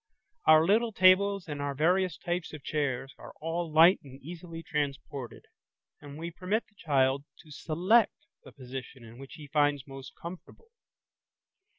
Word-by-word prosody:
Our 155 0 +7
little 225 +5 +3
tables 195 0 +4
and 145 -2 -5
our 140 -1 -2
various 180 +3 +2
types 175 -1 -3
of 150 -3 -9
chairs 135 -3 -2
are - - -11
all 165 +1 -3
light 165 +5 +7
and 135 -1 -13
easily 165 +2 -9
transported, 140 -4 -4 0.6
and 145 0 -10
we 170 +2 -5
permit 185 +6 -1
the - - -31
child 140 -6 +1 0.2
to 155 - -17
select 180 +10 +2 0.3
the - - -13
position 125 -2 -10
which 135 0 -11
he 150 - -10
finds 145 -2 +1
most 135 -1 -10
comfortable. 185 - -10
155 Hz, 150 wpm, -29 LUFS, 140-180 Hz, 0.6 s, Our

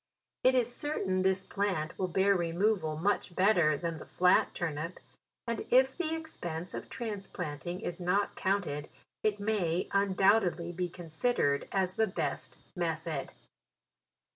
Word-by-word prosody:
It 260 0 +5
is 245 -1 +2
certain 195 -11 0
this 190 0 +2
plant 190 -6 -2
will 185 - +1
bear 195 +3 +3
re 170 -2 0
moval 170 -4 +1
much 195 -1 0
better 175 -6 +4
than 165 0 -3
the - - -10
flat 180 0 +4
turnip, 165 +1 -3 0.5
and 235 -1 -2
if 260 +1 +5
the 325 -2 -1
expense 175 - -5
of - - -6
transplanting 185 - -5
is 175 - -4
not 190 +3 +1
counted, 180 -7 -1 0.3
it 210 -1 +1
may 195 -5 0
undoubtedly 195 -3 +3
be 180 +1 -2
considered 165 -3 0
as 190 -2 +1
the 220 - +3
best 190 - -3 0.2
method. 160 -4 -2
185 Hz, 140 wpm, -31 LUFS, 170-205 Hz, 0.5 s, It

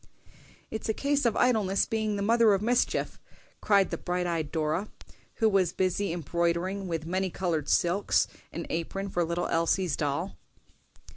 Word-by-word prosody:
"It's 220 0 -4
a 220 - +1
case 285 -1 0
of 225 - 0
idleness 215 -6 +2
being 220 -2 -1
the 200 - -2
mother 230 0 +5
of 195 - -2
mischief," 245 +2 0 0.4
cried 200 -2 +3
the - - -3
bright 180 0 -2
eyed 165 -4 -2
Dora, 160 +5 -1 0.5
who 225 - +2
was 195 -5 +2
busy 190 +1 0
embroidering 170 +3 -1
with 165 -2 -3
many 185 +3 -1
colored 165 -5 -2
silks 175 +4 +2 0.2
an 170 - -5
apron 195 +4 -3
for 175 -2 0
little 170 +1 -1
Elsie's 165 -1 +1
doll. 150 +6 -2
185 Hz, 155 wpm, -28 LUFS, 170-205 Hz, 0.5 s, mother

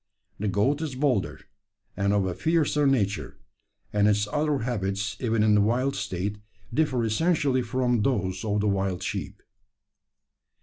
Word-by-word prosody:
The 105 - -1
goat 105 - +1
is 150 -5 -3
bolder, 130 -7 0 0.5
and 100 0 +1
of 100 -2 +2
a 90 - -1
fiercer 150 - +1
nature; 100 - 0 0.6
and 105 0 +3
its 105 0 +2
other 150 -1 +1
habits, 100 -3 -2
even 115 -3 +1
in 110 -1 +4
the 105 - +5
wild 125 +6 +1
state, 100 +1 -3 0.3
differ 130 -4 +1
essentially 140 +2 +1
from 125 -1 0
those 95 -7 -1
of 105 -1 0
the 105 - 0
wild 95 -2 -1
sheep. - - -5
110 Hz, 145 wpm, -26 LUFS, 100-135 Hz, 0.6 s, the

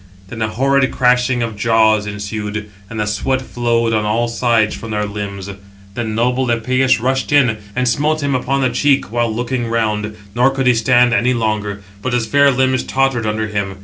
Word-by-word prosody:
Then 115 +1 -7
a 110 - +1
horrid 135 +4 +1
crashing 125 -1 +2
of 115 -2 -4
jaws 110 -1 +2
ensued, 105 0 -5 0.2
and 115 - -6
the 105 - 0
sweat 105 +6 -1
flowed 120 -2 -1
on 110 -1 +1
all 110 +3 0
sides 115 -2 +1
from 115 - -8
their 105 -1 -1
limbs. 100 -2 -6 0.5
Then 110 -1 -3
noble 125 +3 +1
Epëus 125 +2 +2
rushed 130 +4 -1
in, 125 -7 +3 0.2
and 125 0 0
smote 150 +5 +1
him 140 -1 0
upon 135 +2 0
the 130 - +1
cheek, 140 -5 +1
while 120 -1 0
looking 120 +1 -2
round, 110 -2 -1 0.2
nor 125 +3 +3
could 135 -1 -2
he 125 - +5
stand 120 +1 +3
any 125 +2 +2
longer; 105 -3 -2 0.2
but 130 +2 -3
his 120 -2 +1
fair 140 +5 +4
limbs 130 0 +1
tottered 135 -4 0
under 110 +1 -1
him. 100 -2 -3
120 Hz, 190 wpm, -17 LUFS, 110-130 Hz, 0.5 s, he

